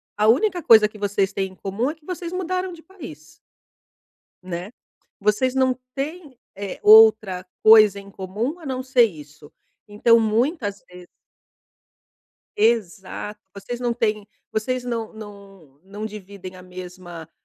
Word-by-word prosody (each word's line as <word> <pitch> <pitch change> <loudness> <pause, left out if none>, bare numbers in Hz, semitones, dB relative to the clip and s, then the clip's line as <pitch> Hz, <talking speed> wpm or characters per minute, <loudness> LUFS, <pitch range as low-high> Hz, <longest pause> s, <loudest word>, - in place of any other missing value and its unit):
a 210 +1 +2
única 350 - +3
coisa 225 -8 +6
que 210 0 -15
vocês 200 -1 0
têm 195 -1 -2
em - - -18
comum 200 +8 -2
é 310 - -5
que 315 -2 -28
vocês 350 -1 -6
mudaram 365 0 -3
de 325 -1 -14
país. 255 - -12 1.2
Né? 180 +2 -6 0.5
Vocês 210 +6 +1
não 260 -1 +3 0.2
têm, 290 -1 -6 0.2
eh, 200 -1 -6
outra 215 -4 +6 0.2
coisa 215 -2 +7
em 200 0 -13
comum 210 - -4
a 325 - -13
não 260 -2 -3
ser 255 -2 +4
isso. 150 -7 -6 0.4
Então, 230 +3 +4
muitas 220 - -1
vezes 180 0 -13 1.5
Exato, 210 -2 -1
vocês 200 +5 -7
não 240 -1 -1
têm 215 -3 -1 0.2
vocês 250 +3 -2
não 230 -3 -4
não 200 -9 -13
não 205 +3 -7
dividem 200 -3 -10
a 185 - -12
mesma 180 -2 -10
215 Hz, 140 wpm, -22 LUFS, 190-255 Hz, 1.5 s, coisa